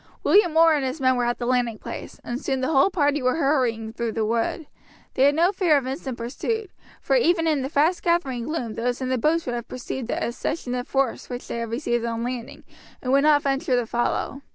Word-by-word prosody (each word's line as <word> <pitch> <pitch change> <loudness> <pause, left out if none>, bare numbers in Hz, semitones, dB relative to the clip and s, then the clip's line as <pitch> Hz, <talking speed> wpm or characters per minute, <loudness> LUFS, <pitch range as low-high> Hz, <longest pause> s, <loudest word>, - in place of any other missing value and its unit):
William 350 -6 +4
Orr 325 0 +7
and 290 -3 0
his 260 +4 -3
men 260 -1 +3
were 245 -1 0
at 240 0 0
the 240 - -4
landing 245 -3 +1
place, - - -8
and 245 +2 -4
soon 265 -1 -1
the 260 - 0
whole 275 +4 +5
party 295 -5 +1
were 255 0 +2
hurrying 250 -8 0
through 230 -1 -3
the 220 -1 0
wood. 230 +8 -1 0.5
They 265 - +3
had 285 +1 +4
no 340 +4 +3
fear 355 -6 +3
of 275 - -2
instant 265 -1 -4
pursuit, 395 - -3 0.3
for - - 0
even 350 -8 +3
in 305 -4 +1
the 265 - -3
fast 315 +5 +2
gathering 270 -9 0
gloom 250 -8 -3
those 245 +2 -2
in 260 -1 -3
the 255 -1 0
boats 320 +6 +1
would 245 - -2
have 240 0 -4
perceived 255 -1 -5
the - - -1
accession 245 +2 -3
of 250 0 -3
force 270 -3 -1
which 245 -1 -6
they - - -4
had 230 -1 -4
received 240 -1 -1
on 230 0 -2
landing, 245 -1 -5 0.4
and 255 - -3
would 275 +1 +5
not 295 0 +4
venture 270 -2 +1
to 245 -1 +1
follow. 240 +4 -2
260 Hz, 235 wpm, -24 LUFS, 240-305 Hz, 0.5 s, Orr